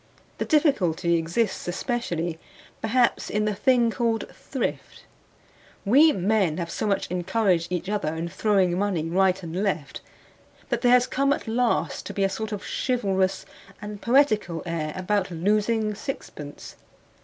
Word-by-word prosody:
The - - -1
difficulty 200 - +2
exists 175 +7 -1
especially, 175 -5 -2 0.4
perhaps, 240 +2 +1
in 210 0 0
the 210 - 0
thing 240 +2 +3
called 230 -2 0
thrift; - - -5 0.8
we 285 +10 +6
men 190 - +1
have 170 -2 -4
so - - -2
much 200 - +1
encouraged 180 -1 +1
each 180 0 -2
other 195 -7 -1
in 165 +1 -3
throwing 190 -2 +1
money 195 -6 0
right 190 +2 +2
and 170 +3 -3
left, 180 -9 -2 0.7
that - - -1
there 245 - +4
has 250 0 +5
come 275 +2 +1
at - - -6
last 235 +1 0
to - - -7
be 200 - +1
a 195 - +3
sort 220 +2 -4
of 205 -2 -5
chivalrous 195 -6 0 0.3
and 210 0 -7
poetical 230 - +2
air 165 -3 -2
about 190 +1 0
losing 210 +5 +1
sixpence. 175 - -8
200 Hz, 145 wpm, -25 LUFS, 175-230 Hz, 0.8 s, we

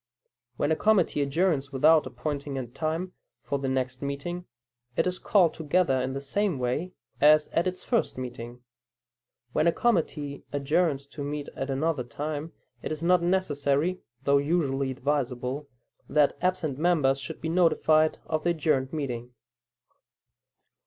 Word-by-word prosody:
When 145 - +1
a - - +4
committee 190 -6 +2
adjourns 140 -1 +1
without 150 +2 +4
appointing 140 +2 -4
a 130 - -3
time 160 +8 -3 0.3
for 140 - -2
the 135 -1 -2
next 130 -1 -2
meeting, 145 +6 -4 0.5
it - - +3
is 180 0 -2
called 180 -6 +3
together 155 -4 +1
in 130 +1 -2
the 135 - -3
same 185 +4 0
way 130 +9 -2 0.3
as 150 +1 +6
at 170 +2 +1
its 185 0 -4
first 235 - 0
meeting. 120 -1 -7 0.9
When 160 - +2
a - - +6
committee 155 -10 0
adjourns 145 0 +1
to 140 +1 -8
meet 145 0 -4
at 135 - -4
another 140 0 0
time, 145 +6 -5 0.3
it - - -4
is 155 +1 -4
not 180 0 +4
necessary 170 -2 +1 0.2
(though 140 0 +4
usually 140 -3 0
advisable) 130 0 -2 0.4
that 150 -1 +3
absent 170 -7 0
members 150 -6 +3
should 135 - -6
be 160 - -3
notified 160 -2 +3
of 155 -1 -2
the 175 - +2
adjourned 150 -5 +1
meeting. 125 -5 -4
150 Hz, 145 wpm, -27 LUFS, 135-170 Hz, 0.9 s, as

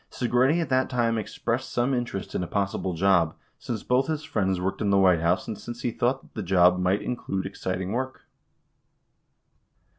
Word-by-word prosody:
4 125 - -3
Segretti 130 +7 +3
at 165 -5 -2
that 130 0 +2
time 120 -3 +1
expressed 120 +4 -3
some 120 +3 +1
interest 120 -6 -3
in - - -1
a 90 - -3
possible 100 -2 -1
job, 85 -3 +3 0.2
since 115 -4 -4
both 125 +2 +2
his 155 -1 -2
friends 95 -7 0
worked 95 +4 -2
in 105 - +1
the 100 - +4
White 90 -3 +5
House 85 +3 +1
and 110 -3 -5
since 120 +1 -8
he 120 - 0
thought 125 +4 0
that - - -21
the 110 - -4
job 90 -1 +4
might 90 +2 +1
include 95 -6 -3
exciting 95 -1 -3
work. 130 +3 -3
105 Hz, 190 wpm, -26 LUFS, 95-125 Hz, 0.2 s, White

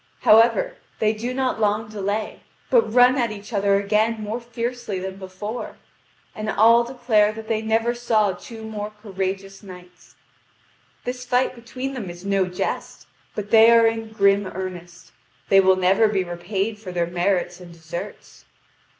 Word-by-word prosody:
However, 240 - +4 0.2
they 215 0 +2
do 230 +3 -4
not 255 -2 -1
long 210 0 +1
delay, 210 0 -3 0.3
but 475 - +4
run 250 +3 +5
at 235 -2 +1
each 210 +2 -9
other 200 -1 +2
again 215 +3 +1
more 215 +2 -4
fiercely 235 -2 -4
than 190 +1 -5
before. 195 +5 -7 0.6
And 215 0 -5
all 230 +2 +5
declare 235 -4 +2
that 220 0 -9
they 220 -1 0
never 225 +2 +1
saw 225 -4 +1
two 220 +5 -10
more 210 -1 -5
courageous 195 -1 -4
knights. 180 -2 -14 0.9
"This 250 0 -5
fight 250 +1 +1
between 255 +3 -6
them 230 -9 -5
is 175 +2 -10
no 195 -2 +1
jest, 180 0 -4 0.3
but 210 0 -5
they 225 0 +8
are 230 0 +6
in 225 -1 -1
grim 200 -2 +3
earnest. 180 -2 -8 0.4
They 195 - +6
will 190 0 +4
never 190 +4 +3
be 200 -3 0
repaid 190 +5 -3
for 195 -4 -8
their 175 -1 0
merits 175 0 -1
and 175 -1 -11
deserts." 165 0 -9
210 Hz, 160 wpm, -22 LUFS, 190-230 Hz, 0.9 s, they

